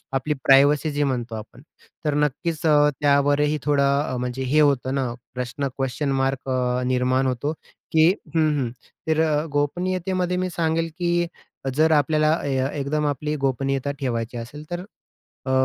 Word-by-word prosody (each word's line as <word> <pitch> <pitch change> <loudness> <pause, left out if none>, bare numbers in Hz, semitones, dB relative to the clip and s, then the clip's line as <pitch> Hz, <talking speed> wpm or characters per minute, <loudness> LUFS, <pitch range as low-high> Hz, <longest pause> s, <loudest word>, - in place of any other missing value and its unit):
आपली 135 +3 0
प्रायव्हसी 145 +3 +5
जी 145 0 0
म्हणतो 120 -4 -2
आपण 110 +4 -10 0.4
तर, 150 - +1
नक्कीच 150 +3 -1
अ, 150 -1 +5
त्यावरही 145 +1 +3
थोडं 145 -2 +2 0.3
अ, 125 - -2
म्हणजे 125 +1 -3
हे 155 - +5
होतं 135 -2 +2
ना 130 -3 -1 0.2
प्रश्न, 125 +3 -3
क्वेशन 135 +1 -1
मार्क 135 0 -1
अ, 125 -1 0
निर्माण 130 +1 +1
होतो, 130 +4 -1 0.4
की 160 +1 +5 0.3
हं, 155 -1 +4
हं, 125 -3 -1 0.4
तर 160 0 +2
अ, 150 -1 +1
गोपनीयतेमध्ये 180 +4 -1
मी 185 0 -1
सांगेल, 165 0 0
की 175 0 +1 0.5
जर 160 +2 +4
आपल्याला 155 +1 +2
ए 135 -2 0 0.2
एकदम 150 +2 -1
आपली 150 +2 -2
गोपनीयता 135 +1 -1
ठेवायची 120 -2 -2
असेल 125 +6 -8
तर 175 +2 -4 0.6
अ, - - 0
145 Hz, 155 wpm, -23 LUFS, 130-155 Hz, 0.6 s, प्रायव्हसी